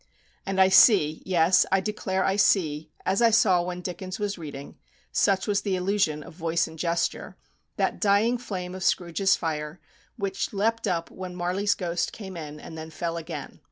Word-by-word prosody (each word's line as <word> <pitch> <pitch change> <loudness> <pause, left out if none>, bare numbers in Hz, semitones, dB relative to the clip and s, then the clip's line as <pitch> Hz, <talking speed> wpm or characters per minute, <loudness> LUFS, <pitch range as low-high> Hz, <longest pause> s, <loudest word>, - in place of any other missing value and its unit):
And 195 0 -1
I 190 - +7
see 190 -5 +5
yes, 180 0 +4
I 195 - +4
declare 190 -1 -2
I 195 - +1
see, 160 -6 +2 0.2
as 195 +4 +1
I 230 - +6
saw 190 -5 +4
when 180 0 -5
Dickens 185 +1 -5
was 205 -1 -2
reading, 145 -5 -9 0.3
such 195 -1 +2
was 205 -1 +1
the 200 -2 -1
illusion 180 -5 0
of - - -12
voice 165 0 0
and 160 0 -12
gesture 170 +1 -2 0.4
that - - -1
dying 215 +4 +3
flame 185 -7 -5
of 185 0 -6
Scrooge's 185 +2 +2
fire, 155 0 -4 0.4
which 195 -2 -3
leaped 225 +3 0
up 170 -3 -2
when 185 -1 -7
Marley's 185 +4 0
ghost 175 -2 -2
came 190 -4 -8
in, 150 -2 -7
and 160 - -10
then 160 0 -7
fell 165 +1 -4
again. 160 -3 -7
185 Hz, 180 wpm, -26 LUFS, 165-195 Hz, 0.4 s, I